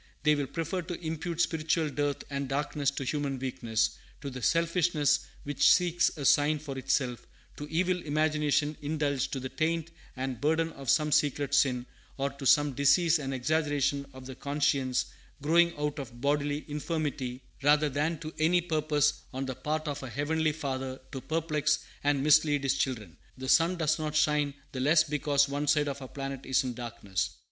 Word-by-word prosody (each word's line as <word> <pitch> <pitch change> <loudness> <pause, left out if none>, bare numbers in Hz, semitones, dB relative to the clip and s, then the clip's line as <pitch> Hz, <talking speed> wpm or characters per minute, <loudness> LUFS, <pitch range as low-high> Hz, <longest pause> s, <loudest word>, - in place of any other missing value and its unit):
They 150 0 +5
will 145 -2 -1
prefer 165 +4 -3
to 175 0 -6
impute 160 +1 -2
spiritual 160 -1 +1
dearth 145 0 -1
and 140 -1 -3
darkness 145 0 0
to 140 -1 -4
human 140 0 -2
weakness, 120 -4 -1 0.2
to 140 - -5
the 125 0 -7
selfishness 165 -2 +2 0.2
which 145 0 +3
seeks 175 -1 +3
a 140 - -4
sign 145 +3 +4
for 145 -2 -7
itself, 130 -2 -1 0.3
to 145 - -6
evil 180 +2 +1
imaginations 150 -1 +1
indulged, 145 -3 -1
to 135 - -2
the 130 0 -5
taint 165 +2 -1 0.3
and 130 -3 -4
burden 160 +2 +1
of 140 -4 -7
some 150 +2 +3
secret 145 -1 +1
sin, 125 -3 +3 0.3
or 140 0 -1
to 140 0 -4
some 145 0 +4
disease 160 +5 +4
and 135 -2 -4
exaggeration 140 +1 0
of 130 -1 -11
the 130 - -7
conscience, 140 -2 0 0.3
growing 170 +4 +4
out 150 0 -2
of 120 -3 -8
bodily 145 +2 0
infirmity, 145 -4 -3 0.2
rather 150 +2 +4
than 150 +4 -1
to 155 0 -6
any 165 +3 +4
purpose 155 -3 +1
on 130 +1 -3
the 130 - -3
part 155 +4 -3
of 145 -1 -3
our 130 - -6
Heavenly 155 +5 0
Father 135 -3 -4
to 135 -3 -5
perplex 150 -1 0 0.3
and 145 -1 +2
mislead 150 -1 +4
His 135 - +2
children. 110 - -3 0.2
The 130 0 -6
sun 170 +4 +4
does 160 -1 +1
not 155 -1 -3
shine 150 -2 +2 0.2
the 135 - -5
less 155 +5 +5
because 145 -2 +1
one 145 +1 -3
side 145 0 +3
of 140 0 -4
our 130 - -7
planet 135 0 -6
is 135 +1 +3
in 125 -1 -3
darkness. 115 -6 -3
145 Hz, 180 wpm, -29 LUFS, 135-155 Hz, 0.3 s, They